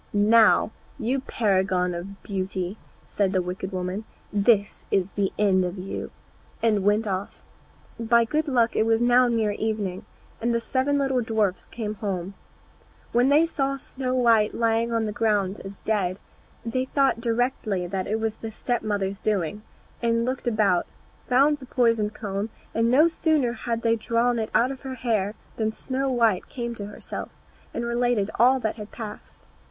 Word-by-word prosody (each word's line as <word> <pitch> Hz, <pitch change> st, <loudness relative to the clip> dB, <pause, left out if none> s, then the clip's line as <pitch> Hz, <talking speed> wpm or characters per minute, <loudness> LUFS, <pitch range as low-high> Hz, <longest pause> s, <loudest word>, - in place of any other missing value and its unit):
"Now, 215 Hz, +1 st, +5 dB, 0.3 s
you 250 Hz, +4 st, 0 dB
paragon 190 Hz, -7 st, +1 dB
of 190 Hz, +3 st, -7 dB
beauty," 190 Hz, 0 st, -3 dB, 0.3 s
said 200 Hz, -1 st, 0 dB
the 185 Hz, -, +2 dB
wicked 185 Hz, +2 st, -5 dB
woman, 185 Hz, +3 st, -3 dB, 0.3 s
"this 205 Hz, 0 st, +2 dB
is 190 Hz, -2 st, +2 dB
the 200 Hz, -2 st, 0 dB
end 195 Hz, -3 st, +3 dB
of 180 Hz, +2 st, -3 dB
you," 185 Hz, +1 st, -5 dB, 0.5 s
and 210 Hz, -4 st, +3 dB
went 210 Hz, +2 st, +3 dB
off. 195 Hz, -1 st, -4 dB, 0.6 s
By 230 Hz, 0 st, +4 dB
good 305 Hz, +6 st, -1 dB
luck 240 Hz, -4 st, +2 dB
it 220 Hz, -, +2 dB
was 225 Hz, 0 st, +3 dB
now 245 Hz, +1 st, +5 dB
near 225 Hz, -3 st, +1 dB
evening, 205 Hz, -3 st, -2 dB, 0.4 s
and 235 Hz, +1 st, +1 dB
the -, -, +2 dB
seven 265 Hz, +4 st, 0 dB
little 270 Hz, -2 st, +1 dB
dwarfs 220 Hz, -5 st, 0 dB
came 215 Hz, -3 st, -4 dB
home. 195 Hz, -3 st, -4 dB, 0.8 s
When 245 Hz, +3 st, +3 dB
they 300 Hz, +3 st, +5 dB
saw 275 Hz, -4 st, -1 dB
Snow 260 Hz, -1 st, -4 dB
white 230 Hz, -4 st, +3 dB
lying 230 Hz, 0 st, +1 dB
on 230 Hz, -1 st, +1 dB
the 210 Hz, -, -2 dB
ground 205 Hz, -3 st, 0 dB
as 195 Hz, 0 st, -8 dB
dead, 195 Hz, -4 st, 0 dB, 0.5 s
they 255 Hz, +3 st, -1 dB
thought 270 Hz, -3 st, +1 dB
directly 230 Hz, -5 st, 0 dB
that 185 Hz, +1 st, -3 dB
it 220 Hz, +2 st, 0 dB
was 220 Hz, 0 st, -2 dB
the 225 Hz, -, -6 dB
step 240 Hz, +2 st, -2 dB
mother's 200 Hz, -2 st, -2 dB
doing, 205 Hz, -1 st, -1 dB, 0.4 s
and 230 Hz, 0 st, +1 dB
looked 255 Hz, 0 st, -3 dB
about, 210 Hz, -6 st, +2 dB, 0.4 s
found 280 Hz, +4 st, +4 dB
the 260 Hz, -, -11 dB
poisoned 230 Hz, -5 st, +1 dB
comb, 200 Hz, 0 st, -3 dB, 0.2 s
and 230 Hz, +1 st, +2 dB
no 290 Hz, +7 st, +6 dB
sooner 310 Hz, -7 st, +1 dB
had 230 Hz, 0 st, -3 dB
they 230 Hz, 0 st, +3 dB
drawn 235 Hz, +2 st, +1 dB
it 220 Hz, -, -2 dB
out 250 Hz, +3 st, +4 dB
of 265 Hz, -, -8 dB
her 265 Hz, -1 st, -5 dB
hair 215 Hz, -5 st, 0 dB, 0.2 s
than 220 Hz, -1 st, 0 dB
Snow 265 Hz, +4 st, -2 dB
white 230 Hz, -7 st, +2 dB
came 235 Hz, -2 st, -4 dB
to 205 Hz, -3 st, -6 dB
herself, 205 Hz, -, -7 dB, 0.4 s
and 235 Hz, -, -3 dB
related 235 Hz, -3 st, +1 dB
all 255 Hz, +3 st, +5 dB
that 220 Hz, -1 st, -2 dB
had 210 Hz, -1 st, -8 dB
passed. 220 Hz, -3 st, -9 dB
225 Hz, 170 wpm, -25 LUFS, 200-240 Hz, 0.8 s, no